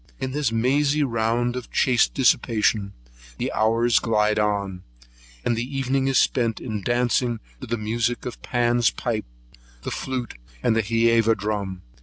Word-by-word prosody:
In 130 -1 -3
this 140 -4 0
mazy 140 +6 +2
round 120 0 0
of 125 - -6
chaste 125 -3 +2
dissipation, 110 -5 +2 0.4
the - - -3
hours 115 +1 +3
glide 105 -2 +1
gently 105 -1 +3
on, 100 -3 -4 0.6
and 120 - +2
the 125 +4 -4
evening 135 0 0
is 135 -2 +2
spent 115 -3 +2
in 110 -4 -4
dancing 120 +1 +1 0.2
to 130 - -8
the 120 +1 -1
music 115 +3 -1
of 125 - -6
Pan's 120 -1 +2
pipes, 115 - -3 0.6
the - - -4
flute, 125 - -4 0.2
and 110 - +3
hæva 115 0 +3
drum. 100 -3 -3
115 Hz, 150 wpm, -23 LUFS, 110-125 Hz, 0.6 s, hours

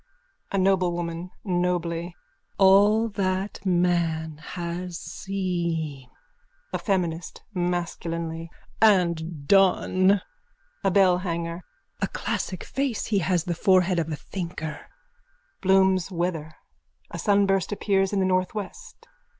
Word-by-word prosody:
A 195 - 0
NOBLEWOMAN: 175 -2 0 0.2
(Nobly.) 175 -2 -1 0.4
All 205 +3 +5
that 195 0 -2
man 170 -4 +1
has 175 +1 -5
seen! 170 -9 -3 0.6
A 180 - 0
FEMINIST: 175 -4 -2
(Masculinely.) 170 -2 -3 0.3
And 170 -7 +2
done! 195 0 +4 0.6
A 195 - +3
BELLHANGER: 180 -3 +1 0.4
A 195 - +2
classic 185 -1 -3
face! 270 -4 -2
He 210 -3 +1
has 175 -1 +1
the 175 - -2
forehead 185 0 +3
of 165 -1 -2
a - - -1
thinker. 165 -2 -6 0.7
_(Bloom's 190 -1 +3
weather. 170 -4 -3 0.6
A - - -5
sunburst 200 -3 +2
appears 195 -2 +1
in 200 - 0
the 190 - +2
northwest.) 190 - -3
180 Hz, 100 wpm, -25 LUFS, 170-195 Hz, 0.7 s, All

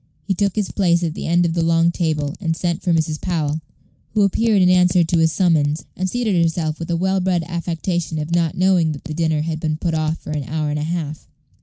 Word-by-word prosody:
He 195 - 0
took 200 0 0
his 210 -3 -1
place 175 -3 +2
at 165 -2 -1
the - - -5
end 175 +1 +3
of 165 - 0
the 170 - 0
long 165 +1 +3
table, 155 -4 -1
and 165 -4 -1
sent 175 +1 -2
for 180 - 0
Mrs. 155 -2 0
Powell, 160 -4 -1 0.5
who 210 - +4
appeared 210 +2 +2
in - - +5
answer 180 -1 +4
to 165 +1 0
his 160 0 +3
summons, 160 -4 +1
and 185 +1 -2
seated 215 -6 +1
herself 160 -2 -1
with 165 - -6
a 170 - +1
well 190 +2 +1
bred 180 -2 0
affectation 170 -1 -2
of 155 +2 -3
not 170 -2 +1
knowing 180 -4 +3
that 145 - -10
the 155 - -6
dinner 160 -1 0
had 160 -1 -3
been 155 -1 -1
put 165 0 -2
off 155 0 0
for - - -9
an 150 -3 -3
hour 155 +1 -2
and 150 - -2
a - - -2
half. 155 -1 -4
165 Hz, 245 wpm, -20 LUFS, 155-180 Hz, 0.5 s, in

